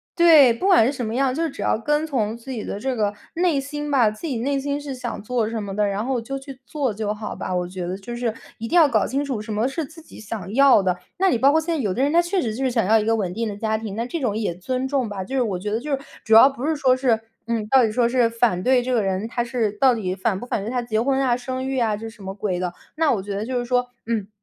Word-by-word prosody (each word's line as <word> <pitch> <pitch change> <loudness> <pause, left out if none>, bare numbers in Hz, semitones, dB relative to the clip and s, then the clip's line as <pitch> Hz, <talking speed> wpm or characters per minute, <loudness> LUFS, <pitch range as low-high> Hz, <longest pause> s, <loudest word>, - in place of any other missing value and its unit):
对， 320 -7 +7
不 230 +11 -3
管 375 - +6
是 - - +1
什 255 -4 -4
么 220 - -3
样， 260 +1 +1
就 330 +1 0
只 285 - -8
要 - - +1
跟 295 +6 0
从 225 -7 -1
自 235 +3 -13
己 230 -5 -4
的 200 - -5
这 260 +3 -2
个 210 -3 0 0.2
内 340 -4 +2
心 295 +1 -5
吧， 250 -6 +4
自 215 +8 -8
己 270 -7 -2
内 275 +4 0
心 285 +1 -2
是 290 -1 -6
想 245 -2 -5
做 230 +1 -1
什 225 -1 -3
么 195 -1 -5
的， 210 0 +2
然 200 +1 -2
后 255 0 -1
就 270 +4 -5
去 270 -1 -11
做 275 -1 -1
就 210 0 -2
好 210 0 -6
吧， 185 - -4
我 180 0 -1
觉 180 -1 -5
得 180 - -3
就 200 +5 -7
是 240 -2 -1 0.2
一 230 - -5
定 340 - -2
要 325 -4 +7
搞 - - +2
清 275 +2 -1
楚 265 -6 -3
什 215 +1 -5
么 215 +4 +1
是 295 +3 -3
自 315 +4 -14
己 320 - -14
想 205 -3 -6
要 275 -5 +6
的。 180 -2 0 0.2
那 385 0 +4
你 245 - +2
包 275 +4 +5
括 320 +2 +3
现 335 +1 -2
在 - - -2
有 205 -8 0
的 245 - -1
人， 280 +2 +2
他 335 - +4
确 350 +2 +1
实 220 -3 -2
就 265 - -3
是 255 - +1
想 230 -2 +1
要 225 - +5
一 215 - 0
个 225 +1 +2
稳 195 -5 -2
定 225 +5 -2
的 205 - -4
家 220 0 0
庭， 215 -3 -6
那 230 +2 -2
这 335 - -3
种 235 -7 -1
也 210 -6 -2
尊 255 +8 -2
重 265 -3 0
吧， 200 -3 -5
就 265 +8 -5
是 255 - +3
我 195 -6 -2
觉 210 +3 -4
得 215 +2 -1
就 295 +5 -6
是 275 - +1 0.3
主 220 - +2
要 230 +5 +9
不 270 0 -6
是 315 +1 +1
说 265 -4 +3
是 245 -4 +2 0.2
嗯， 230 -2 -2
到 260 +3 +5
底 220 - +1
说 235 +1 +2
是 245 -1 +3
反 230 -5 +1
对 255 0 +4
这 255 +1 -3
个 235 -4 +2
人， 195 +2 -1
他 240 +1 -2
是 235 -4 -1
到 255 +4 +4
底 190 -5 -2
反 195 0 -1
不 245 - -8
反 205 - -2
对 220 - -4
他 250 -1 0
结 220 -2 -1
婚 265 +3 +1
啊、 250 -2 +2
生 255 +1 -4
育 270 - -2
啊 220 -3 +1
就 225 +2 -7
是 225 - -16
什 205 - -14
么 190 - -5
鬼 195 -3 -2
的。 180 -1 -2 0.2
那 315 -1 +2
我 210 - -1
觉 200 +1 -5
得 205 - -3
就 250 +1 -1
是 245 - -3
说， 245 0 +1 0.2
嗯， 220 -4 -1
240 Hz, 340 characters per minute, -22 LUFS, 215-270 Hz, 0.3 s, 要